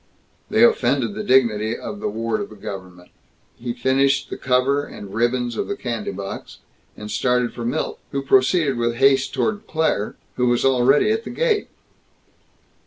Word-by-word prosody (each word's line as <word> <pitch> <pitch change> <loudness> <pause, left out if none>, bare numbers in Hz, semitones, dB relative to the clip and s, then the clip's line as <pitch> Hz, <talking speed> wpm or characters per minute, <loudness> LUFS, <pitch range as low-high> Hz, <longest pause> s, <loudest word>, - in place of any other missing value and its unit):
They 220 +2 +4
offended 130 - +3
the - - -4
dignity 115 -4 +2
of 200 0 -7
the - - -2
ward 115 +1 -2
of - - -5
the 110 - -12
Government. 90 -3 -9 0.5
He 120 0 -4
finished 135 +3 +1
the - - -3
cover 130 +3 +1
and 100 -8 -10
ribbons 120 +1 0
of - - -2
the 200 - -2
candy 115 - -4
box, 100 0 -7 0.4
and 105 0 -7
started 125 +3 +1
for 120 - -6
Milt... 130 +7 -2
who 140 0 -2
proceeded 135 +1 +3
with 120 0 0
haste 135 +1 +3
toward 215 -2 -2
Claire... 155 -10 0 0.2
who 125 0 +2
was 120 +1 +2
already 135 - +4
at 225 +1 0
the - - -7
gate. 460 -4 0
125 Hz, 170 wpm, -22 LUFS, 115-140 Hz, 0.5 s, They